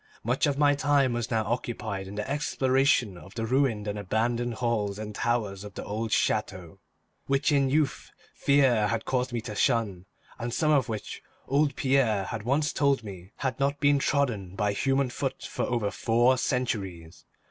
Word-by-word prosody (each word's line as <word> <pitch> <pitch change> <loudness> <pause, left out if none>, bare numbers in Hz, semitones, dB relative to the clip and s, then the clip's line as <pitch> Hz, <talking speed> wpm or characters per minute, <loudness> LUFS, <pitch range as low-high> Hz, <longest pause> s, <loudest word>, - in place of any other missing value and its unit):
Much 125 +6 +1
of 140 -1 0
my 145 -1 +4
time 140 -2 +2
was 120 -1 -2
now 110 -2 +1
occupied 110 -4 -3
in 100 - -8
the 105 +3 -3
exploration 135 -7 +1
of 95 - -14
the 115 -1 -2
ruined 120 -4 +1
and 105 0 -3
abandoned 115 +4 -1
halls 110 -5 -1
and 105 0 -6
towers 105 -4 -1
of 105 -1 -10
the - - -5
old 110 +1 -3
chateau, 95 -7 -1 0.5
which 140 +2 +2
in 140 -2 +3
youth 150 +1 0 0.2
fear 130 -7 +3
had 110 +1 -2
caused 130 -1 -1
me 120 - -1
to 110 -1 -6
shun, 105 -5 0 0.3
and 120 +1 -3
some 155 -1 +2
of 135 -4 +3
which 110 -2 -5 0.3
old 140 +1 +2
Pierre 130 -7 +2
had 110 +3 -5
once 140 +7 0
told 140 -4 +2
me 95 -2 -10
had 130 -2 -3
not 140 +1 0
been 145 -1 +4
trodden 120 -11 0
by 105 0 0
human 135 +3 +1
foot 135 +1 -3
for - - -3
over 115 -5 -1
four 120 +3 +3
centuries. 100 - -3
120 Hz, 180 wpm, -27 LUFS, 105-135 Hz, 0.5 s, my